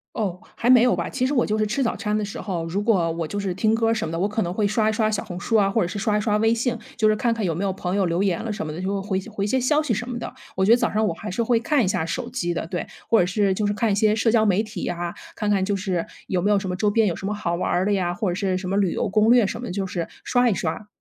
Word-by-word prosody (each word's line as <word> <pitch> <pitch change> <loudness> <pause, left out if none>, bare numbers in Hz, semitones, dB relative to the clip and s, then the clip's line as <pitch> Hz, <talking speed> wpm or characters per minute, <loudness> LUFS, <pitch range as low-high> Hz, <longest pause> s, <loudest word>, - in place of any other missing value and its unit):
哦， 190 -5 -2 0.2
还 240 +2 +1
没 250 -2 +7
有 250 - +4
吧。 - - -3
其 255 -2 0
实 290 - -1
我 245 - +3
就 215 +1 -1
是 215 - +1
吃 240 +6 -1
早餐 210 -3 -1
的 215 - -1
时 200 - -6
候， 175 -5 -3
如 185 +5 -2
果 190 -7 +2
我 165 0 -3
就 205 +6 -4
是 195 -2 -2
听 215 +4 +1
歌 225 0 +2
什 215 -6 -1
么 160 - -5
的， 165 - -2
我 200 - +1
可 210 +1 -1
能 175 0 -3
会 210 - 0
刷 215 +1 +1
一 220 - +2
刷 215 0 +1
小 210 - -2
红 175 - -7
书 225 +5 +1
啊， 200 -2 +4
或 210 +1 +1
者 170 - -1
是 190 +3 -5
刷 210 0 +1
一 210 - +1
刷 210 -1 +1
微 225 +1 +3
信。 235 0 -1 0.2
就 215 -4 +3
是 215 - +3
看 235 -1 +1
看 220 -3 -3
有 170 - +1
没 175 +5 -2
有 195 - 0
朋 185 0 -3
友 195 -2 +2
留 170 +3 0
言 185 -4 0
了 225 - -2
什 210 - -4
么 155 - -5
的， 170 - -6
就 195 +1 -2
回 190 -1 -1
些 190 - -7
回 205 -3 -3
些 260 +6 +1
消 295 +5 +2
息 270 -6 -1
什 240 +4 -3
么 245 - -4
的。 235 - -5 0.2
我 190 - +1
觉 205 - +3
得 235 - +8
早 - - +1
上 215 +1 +1
我 205 - +1
还 215 - -8
是 220 +5 -1
会 230 0 +2
看 280 -1 +1
一 - - +1
下 160 -3 0
手 235 +8 -3
机 175 -9 -2
的， - - -2
对。 175 -1 -3 0.2
或 230 - +5
者 175 - +3
是 195 +1 +1
就 210 +2 -1
是 205 - +1
看 220 +2 0
一 200 - +2
些 215 0 +3
社 225 +1 +2
交 220 -1 +3
媒 200 +2 +3
体 210 -4 -7
呀， 175 0 -3 0.2
看 210 -1 -2
看 195 -2 +2
就 205 +1 0
是 185 -3 -2 0.2
有 185 - 0
没 205 +4 +2
有 200 - +3
什 190 - -5
么 180 - -2
周 210 +3 +1
边 210 0 +3
有 170 - -2
什 195 - -6
么 210 - -1
好 170 -4 -2
玩 180 - -2
儿 180 - +1
的 205 - +1
呀， 175 -3 0
或 185 0 -1
者 175 - -3
是 190 -2 0
什 185 -1 -4
么 195 - 0
旅 195 -4 +2
游 - - -1
攻 215 +3 +4
略 245 -3 +6
什 230 +4 -3
么 245 - -6
的， 180 - -4
就 195 0 -2
是 175 -3 -3 0.2
刷 245 -1 +2
一 215 - +2
刷。 180 +4 -3
205 Hz, 385 characters per minute, -23 LUFS, 185-225 Hz, 0.2 s, 得